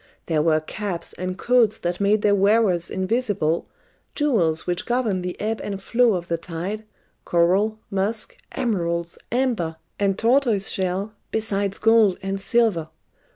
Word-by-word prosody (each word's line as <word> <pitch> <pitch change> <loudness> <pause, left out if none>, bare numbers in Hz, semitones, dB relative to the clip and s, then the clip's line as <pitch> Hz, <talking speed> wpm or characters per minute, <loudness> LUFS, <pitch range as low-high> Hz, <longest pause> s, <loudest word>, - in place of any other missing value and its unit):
There 160 -3 +1
were 155 0 +3
caps 185 +1 -5
and 185 0 -4
coats 235 -2 +3
that 175 0 -3
made 205 +1 +3
their 205 - +4
wearers 200 -3 +3
invisible, 190 -5 0 0.5
jewels 190 - +2
which 175 0 -2
governed 230 -7 0
the 180 0 -5
ebb 220 +1 -2
and 200 -1 -4
flow 235 +3 +3
of 175 -1 -4
the 170 -1 -1
tide, 180 +6 -5 0.4
coral, 190 +6 +2
musk, 205 +3 -1 0.2
emeralds, 170 -6 -2
amber, 235 -10 0 0.2
and 195 -1 +1
tortoiseshell, 205 -5 +1 0.2
besides 200 -2 -1
gold 225 -4 +4
and 195 0 -3
silver. 205 -9 +2
200 Hz, 135 wpm, -23 LUFS, 175-220 Hz, 0.5 s, their